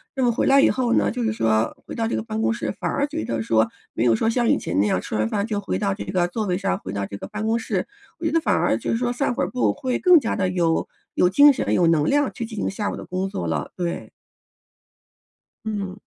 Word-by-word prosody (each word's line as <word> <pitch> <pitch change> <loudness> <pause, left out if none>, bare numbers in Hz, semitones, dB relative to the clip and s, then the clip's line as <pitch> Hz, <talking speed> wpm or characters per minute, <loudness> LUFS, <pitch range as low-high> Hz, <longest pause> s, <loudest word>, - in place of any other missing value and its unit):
那 265 - 0
么 240 - +4
回 230 - 0
来 275 0 +6
以 - - +5
后 245 -2 0
呢， - - +2
就 250 - -4
是 225 -2 0
说 110 - +1
回 - - -8
到 225 -1 -1
这 - - -1
个 - - -2
办 220 -1 -4
公 230 - +2
室， 235 - -3
反 - - -1
而 285 - 0
觉 315 +2 -4
得 115 -1 -2
说 110 0 +2 0.3
没 115 - 0
有 115 - +4
说 225 - +1
像 240 0 +1
以 - - +4
前 95 - -2
那 105 - +3
样 90 - +1
吃 - - -5
完 110 0 +1
饭 200 - -1
就 215 -2 -2
回 200 - -2
到 200 -2 0
这 200 - -6
个 180 -1 0
座 215 +3 -2
位 180 -2 0
上， 90 - -1
回 95 - -7
到 100 -1 -2
这 100 0 -7
个 - - -8
办 215 0 -5
公 225 +1 +1
室， - - -2 0.3
我 330 - -5
觉 320 - +1
得 330 - +3
反 320 - +1
而 - - +2
就 - - -5
是 - - +1
说 245 0 0
散 245 +1 -1
会 - - -1
儿 - - -1
步 250 - +1
会 260 -3 -2
更 360 -2 +7
加 230 - -2
地 185 - 0
有 170 -3 +1 0.3
有 - - +4
精 285 +10 +7
神、 270 - -1
有 175 -2 +3
能 155 -3 +3
量 290 -1 +2
去 235 - -5
进 225 -1 -9
行 - - -1
下 205 +1 -3
午 - - -4
的 - - -8
工 185 +1 -2
作 85 - -4
了， 80 -3 -2
对。 175 -2 -4 1.6
嗯。 200 -4 -3
210 Hz, 305 characters per minute, -23 LUFS, 165-245 Hz, 1.6 s, 更